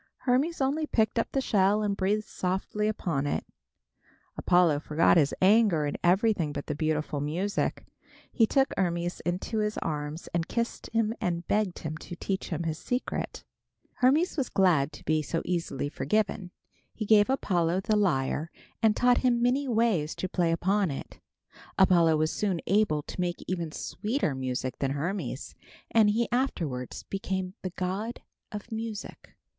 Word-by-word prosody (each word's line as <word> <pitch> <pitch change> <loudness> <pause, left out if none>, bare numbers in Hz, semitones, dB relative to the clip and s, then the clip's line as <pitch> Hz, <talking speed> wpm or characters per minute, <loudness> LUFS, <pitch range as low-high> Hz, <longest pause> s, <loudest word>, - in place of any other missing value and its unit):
Hermes 275 +6 +1
only 295 +4 +1
picked 220 -2 +1
up - - -1
the 270 - 0
shell 205 -3 +2
and 205 -1 0
breathed 200 +3 0
softly 190 +3 -2
upon 165 -9 -1
it. - - -1 0.9
Apollo 175 -5 +3
forgot 155 +2 +3
his 145 -5 +4
anger 195 -6 +5
and 145 - -2
everything 185 -3 +3
but 145 -1 -5
the 150 - -2
beautiful 150 -1 -1
music. 175 +8 -1 0.5
He 225 -3 +3
took 270 +2 +2
Hermes 175 -1 -1
in 175 0 +1
his 215 0 -2
arms 150 0 -4
and 170 -1 0
kissed 235 0 -3
him 225 -1 +1
and 170 -1 -2
begged 205 -4 +1
him 155 0 -3
to 175 - -8
teach 190 +2 -3
him 170 -1 -2
his 160 -1 -3
secret. 250 +6 -3 0.5
Hermes 295 +8 +3
was 270 -4 0
glad 170 -8 +3
to - - -12
be 155 0 +2
so 165 +3 -2
easily 165 -6 -2
forgiven. 185 +6 -1 0.5
He 215 - -3
gave 205 +1 +5
Apollo 180 -8 +1
the 215 +2 +1
lyre 155 -5 +1 0.3
and 220 -2 +4
taught 245 0 +4
him 245 -2 +2
many 255 +4 +1
ways 220 -10 +1
to 185 - -3
play 175 -2 +1
upon 190 +3 +1
it. 135 - -7 0.6
Apollo 170 -4 +5
was 155 +1 +1
soon 195 -5 0
able 185 -6 +2
to 180 - -5
make 175 -1 -2
even 170 -3 -2
sweeter 215 - -2
music 130 -1 -3
than 135 -1 0
Hermes, 155 -3 -3 0.4
and 220 -2 +5
he 230 +3 +1
afterwards 165 - -2
became 190 -1 -3
the 185 - -3
god 190 +6 -4 0.3
of 210 +2 -7
music. 220 -1 -6
185 Hz, 160 wpm, -28 LUFS, 160-220 Hz, 0.9 s, anger